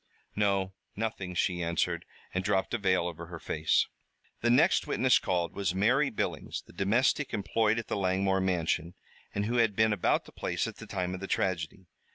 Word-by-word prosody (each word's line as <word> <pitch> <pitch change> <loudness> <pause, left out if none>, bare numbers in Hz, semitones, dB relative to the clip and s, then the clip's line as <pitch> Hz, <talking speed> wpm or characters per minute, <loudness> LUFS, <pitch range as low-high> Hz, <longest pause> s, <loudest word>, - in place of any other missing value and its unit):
"No, 100 -2 +1 0.2
nothing," 100 -4 -3
she 90 0 +1
answered, 85 0 0 0.3
and 90 - -1
dropped 95 +1 0
a 120 - +1
veil 95 -3 +2
over 85 -1 -5
her 85 0 -7
face. 80 -1 +1 0.5
The 120 - +1
next 150 +9 +4
witness 130 -1 +4
called 85 -2 -1
was 95 -2 -1
Mary 125 +9 +3
Billings, - - -3
the - - -16
domestic 120 - +1
employed 110 +2 +1
at 115 - -2
the - - -1
Langmore 95 0 +1
mansion, 85 -2 0 0.4
and 100 0 0
who 120 +3 0
had 115 -4 +3
been 110 0 +4
about 100 - +1
the - - -14
place - - -2
at - - -6
the - - -10
time 90 -1 -2
of 95 - -5
the 95 - -5
tragedy. 95 -1 -1
95 Hz, 190 wpm, -30 LUFS, 90-110 Hz, 0.5 s, next